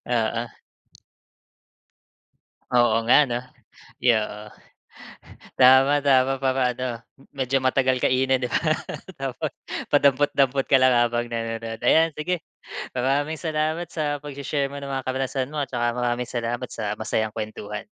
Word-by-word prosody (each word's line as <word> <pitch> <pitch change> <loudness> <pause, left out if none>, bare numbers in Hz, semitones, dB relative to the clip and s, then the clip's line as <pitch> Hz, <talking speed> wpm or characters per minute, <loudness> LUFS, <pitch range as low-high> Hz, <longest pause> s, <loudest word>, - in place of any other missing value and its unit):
Oo. 115 0 -1 2.2
Oo 120 -2 +3
nga, 150 +3 +6
'no. 120 -1 -2 0.6
Ay, 125 - +5
oo. 105 -1 -3 1.1
Tama, 130 +3 +6
tama, 135 -1 +3
para 130 0 +1
ano, 125 +1 -4 0.5
medyo 135 0 0
matagal 130 0 +2
kainin, 130 0 +2
'di 125 - -1
ba? - - +1 0.6
Tapos 135 -2 -3 0.4
padampot-dampot 140 -1 +3
ka 135 - +5
lang 130 -1 +5
habang 120 0 +1
nanonood. 115 -1 -4
Ayan, 165 +5 +5
sige, 170 +3 -2 0.5
maraming 145 +5 0
salamat 155 +1 -1
sa 145 -3 -2
pagshe-share 140 0 -3
mo 140 - -7
ng 140 - -7
mga 135 -1 -2
karanasan 130 0 -2
mo 150 - -3
at 140 - -1
tsaka 120 -1 0
maraming 120 0 -1
salamat 120 +1 -3
sa 105 -2 -3
masayang 110 0 -2
kuwentuhan. 105 -1 -5
130 Hz, 130 wpm, -24 LUFS, 120-140 Hz, 2.2 s, nga